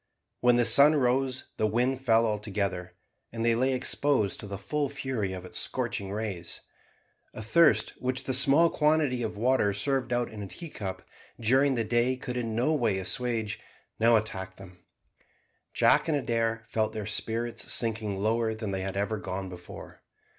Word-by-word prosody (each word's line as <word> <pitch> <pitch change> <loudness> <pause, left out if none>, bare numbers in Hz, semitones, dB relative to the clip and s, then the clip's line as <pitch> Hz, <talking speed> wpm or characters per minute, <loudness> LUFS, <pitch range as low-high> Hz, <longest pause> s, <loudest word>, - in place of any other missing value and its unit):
When 125 0 +4
the 120 -1 +3
sun 140 +6 +7
rose 130 -1 0
the 110 - +1
wind 125 +4 0
fell 115 -2 +4
altogether, 100 -4 -3 0.4
and 115 0 -3
they 115 - +4
lay 130 +3 +1
exposed 130 -5 0
to 105 - -6
the 100 0 -5
full 145 +9 -2
fury 130 -8 -3
of 95 -1 -7
its 90 - -6
scorching 100 -1 -3
rays. 100 -5 -4 0.7
A - - -6
thirst, 165 +8 +4
which 130 +1 -1
the 130 - -2
small 140 +6 +6
quantity 150 -5 +1
of 110 -2 -4
water 115 -3 +2
served 130 +4 -1
out 120 0 0
in 110 -1 -8
a 100 - -6
teacup 95 - -7 0.4
during 130 +4 +3
the 115 - 0
day 120 +3 +1
could 125 -1 -6
in 115 -3 -3
no 125 +7 +1
way 115 -9 +1
assuage, 110 +3 -2 0.4
now 115 +1 +5
attacked 95 -3 -3
them. 90 -2 -13 0.9
Jack - - +3
and 155 -2 +1
Adair 115 -3 -1
felt 110 -1 -1
their 110 -2 -5
spirits 115 +3 -3
sinking 110 -3 +1
lower 110 +2 0
than 110 -2 -5
they 95 -1 -2
had 95 0 -4
ever 105 +2 -1
gone 95 -1 -5
before. 90 -1 -11
115 Hz, 170 wpm, -28 LUFS, 105-130 Hz, 0.9 s, sun